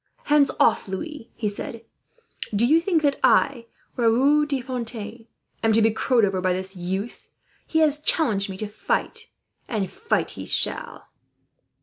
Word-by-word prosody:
"Hands 295 -1 +4
off, - - +3
Louis," 240 - -6
he 220 - -2
said. 225 +3 -6 0.7
"Do 220 +4 +3
you 315 +6 +4
think 335 -3 +1
that 285 -1 +1
I, 240 -4 +3 0.3
Raoul 265 +6 +3
de 280 -2 -1
Fontaine, 235 -3 -6 0.3
am 225 -1 +2
to 225 - +4
be 225 - +4
crowed 230 +1 +2
over 190 -2 -1
by 185 0 +1
this 190 +1 -4
youth? 190 +5 -5 0.4
He 320 - -1
has 300 -2 +4
challenged 225 - +1
me 190 - -6
to 215 - -4
fight, 460 - -3 0.4
and 210 -4 -1
fight 440 - -2
he - - -8
shall." - - 0
230 Hz, 155 wpm, -24 LUFS, 205-290 Hz, 0.7 s, Hands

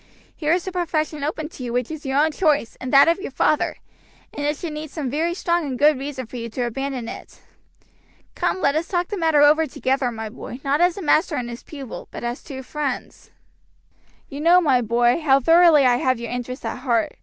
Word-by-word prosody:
Here 305 -1 -1
is 350 +1 +1
a - - -2
profession 315 -4 -2
open 310 +1 -3
to 260 - -10
you 240 -1 -4
which 250 +3 -1
is 310 -3 -7
your 270 +1 0
own 310 +2 +3
choice 300 -7 +1
and 255 - -4
that 275 +2 +7
of 335 +3 +2
your 390 - -5
father, 300 +2 +1 0.6
and 290 - -5
it 295 0 -1
should 330 -2 -5
need 305 0 -6
some 285 -4 -4
very 330 +4 -1
strong 345 -2 0
and 270 -4 -4
good 295 0 +4
reason 270 -2 -5
for 245 +2 -9
you 235 0 -5
to 245 +3 -3
abandon 255 0 -3
it. - - -10 0.9
Come 375 - -1
let 280 - +3
us 315 +2 -1
talk 350 -1 -1
the 415 - -3
matter 320 -4 +3
over 310 +2 +5
together, 265 0 -1
my 225 -2 -5
boy, 245 +3 -9
not 280 +3 +1
as 355 +1 +3
a 395 - -5
master 310 +1 +2
and 245 -3 -3
his 235 - -8
pupil, 275 -6 -9
but - - -8
as 240 +1 -3
two 265 -3 -8
friends. 285 -1 -5 1.0
"You 280 0 -7
know, 345 +3 +6
my 275 -8 +3
boy, 240 +5 +2
how 275 -3 +4
thoroughly 330 -1 +6
I 245 -1 +4
have 255 -1 0
your 235 -1 -6
interest 245 0 -5
at 225 +2 -4
heart. 235 -4 0
285 Hz, 225 wpm, -22 LUFS, 250-315 Hz, 1.0 s, that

